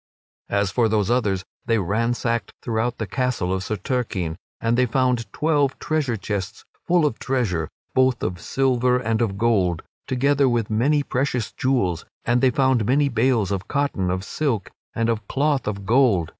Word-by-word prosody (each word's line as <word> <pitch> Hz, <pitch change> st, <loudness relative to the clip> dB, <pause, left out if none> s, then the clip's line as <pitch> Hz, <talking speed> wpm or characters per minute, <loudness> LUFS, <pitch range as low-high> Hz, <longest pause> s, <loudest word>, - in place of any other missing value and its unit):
As 100 Hz, -1 st, +1 dB
for 115 Hz, +1 st, +2 dB
those 105 Hz, 0 st, +1 dB
others, 105 Hz, -7 st, +1 dB, 0.2 s
they 115 Hz, -, +3 dB
ransacked 115 Hz, +2 st, -1 dB
throughout 120 Hz, +1 st, -1 dB
the 110 Hz, -, -3 dB
castle 120 Hz, -5 st, -1 dB
of 95 Hz, 0 st, -2 dB
Sir 110 Hz, -, -2 dB
Turquine, 100 Hz, -8 st, -2 dB, 0.2 s
and 115 Hz, +1 st, +1 dB
they 125 Hz, +1 st, +3 dB
found 125 Hz, -1 st, 0 dB
twelve 145 Hz, -3 st, +1 dB
treasure 145 Hz, -7 st, -1 dB
chests 100 Hz, -2 st, -4 dB, 0.2 s
full 175 Hz, -2 st, +4 dB
of 135 Hz, -6 st, -1 dB
treasure, 100 Hz, -12 st, -1 dB, 0.2 s
both 130 Hz, -2 st, +2 dB
of 90 Hz, -1 st, -3 dB
silver 125 Hz, -2 st, +2 dB
and 115 Hz, -2 st, -1 dB
of 100 Hz, -4 st, 0 dB
gold, 100 Hz, -7 st, +1 dB, 0.2 s
together 140 Hz, +1 st, +2 dB
with 115 Hz, -3 st, 0 dB
many 140 Hz, +7 st, +2 dB
precious 125 Hz, -4 st, -1 dB
jewels; 100 Hz, -, 0 dB, 0.2 s
and 120 Hz, 0 st, +2 dB
they 130 Hz, -, +5 dB
found 130 Hz, -2 st, +2 dB
many 140 Hz, +2 st, +3 dB
bales 115 Hz, -4 st, +1 dB
of 100 Hz, 0 st, -3 dB
cloth 145 Hz, -1 st, 0 dB
of 95 Hz, 0 st, -1 dB
silk 115 Hz, -5 st, -2 dB, 0.2 s
and 115 Hz, 0 st, +1 dB
of 110 Hz, -3 st, -1 dB
cloth 145 Hz, -2 st, 0 dB
of 100 Hz, -2 st, -3 dB
gold. 110 Hz, -8 st, +3 dB
115 Hz, 170 wpm, -23 LUFS, 100-130 Hz, 0.2 s, they